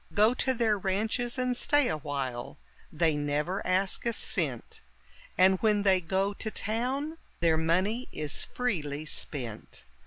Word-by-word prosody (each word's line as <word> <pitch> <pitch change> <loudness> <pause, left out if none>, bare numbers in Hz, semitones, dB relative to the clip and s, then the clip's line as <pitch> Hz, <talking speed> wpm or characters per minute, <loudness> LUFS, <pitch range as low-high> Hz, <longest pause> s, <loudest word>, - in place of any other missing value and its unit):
Go 215 +3 +5
to 260 +1 0
their 220 -3 +2
ranches 220 +6 0
and 255 -1 0
stay 290 +2 +3
a 155 - -1
while, 135 -5 -4 0.3
they 160 -1 +2
never 150 +6 -1
ask 185 +1 +1
a 235 - +1
cent; 145 - -2 0.6
And 185 +1 +5
when 210 -2 +2
they 190 -2 +4
go 190 +4 0
to 220 - -4
town, 260 +10 -2 0.2
their 165 -2 +3
money 185 +10 0
is 150 -1 -2
freely 155 - -2
spent. 120 - -3
190 Hz, 145 wpm, -29 LUFS, 155-225 Hz, 0.6 s, Go